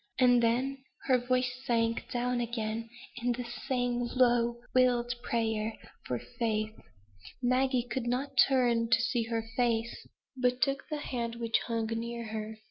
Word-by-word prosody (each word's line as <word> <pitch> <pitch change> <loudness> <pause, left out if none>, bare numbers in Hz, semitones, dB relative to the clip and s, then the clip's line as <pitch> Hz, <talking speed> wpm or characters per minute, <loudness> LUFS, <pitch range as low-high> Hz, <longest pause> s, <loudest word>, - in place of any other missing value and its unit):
And 245 -2 +5
then 255 +4 +1 0.2
her 255 -2 +4
voice 250 0 +1
sank 230 -3 0
down 245 0 0
again 230 -1 -3 0.3
in 245 0 0
the 245 +1 -4
same 245 0 -2
low, 240 -2 +3
wild 245 -1 +3
prayer 220 -2 -1 0.3
for - - -1 0.2
faith. 215 -2 0 0.7
Maggie 255 0 +2
could 250 -1 -3
not 255 +4 -1
turn 240 -4 +4
to 230 0 +5
see 240 -1 0
her 225 -1 -2
face, 235 -2 0 0.3
but 250 -1 +1
took 275 +1 0
the 305 - -2
hand 235 -5 -3
which 230 -1 +1
hung 230 -2 0
near 230 +1 -3
her. 220 0 -5
240 Hz, 145 wpm, -31 LUFS, 230-250 Hz, 0.7 s, And